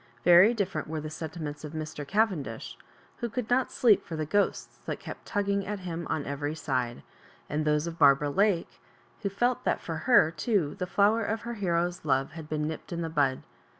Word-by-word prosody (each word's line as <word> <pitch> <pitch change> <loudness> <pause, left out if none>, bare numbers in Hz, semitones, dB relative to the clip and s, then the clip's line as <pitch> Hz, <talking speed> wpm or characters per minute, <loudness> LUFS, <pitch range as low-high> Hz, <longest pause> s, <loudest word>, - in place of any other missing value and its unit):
Very 180 +7 +7
different 195 -3 -2
were 155 0 -3
the 155 0 -6
sentiments 155 -2 -6
of 150 0 -7
Mr. 155 -2 -5
Cavendish, 185 - -1 0.4
who 235 - -3
o6uld 235 0 -4
not 255 +1 +2
sleep 225 -5 +4
for 165 - -6
the 155 -1 -2
ghosts 205 +7 0
that - - -3
kept - - -9
tugging 200 -1 0
at 205 -1 -4
him 170 -2 -5
on 150 - -1
every 145 +2 -3
side; 130 -6 -2 0.4
and 150 +1 -1
those 150 +1 +2
of 170 0 -6
Barbara 145 0 +5
Lake, 195 +1 +1 0.4
who 200 - -1
felt 240 +5 0
that - - +1
for 165 -2 -5
her 165 -10 +6
too 175 -5 0
the 180 - -2
flower 205 +5 +3
of 220 +2 -2
her 235 0 -5
hero's 175 -4 -1
love 135 -2 +1
had 160 -2 -9
been 150 -1 -1
nipped 160 +3 -6
in 170 -1 -2
the 165 - -3
bud. 140 -4 +1
165 Hz, 200 wpm, -28 LUFS, 150-200 Hz, 0.4 s, Very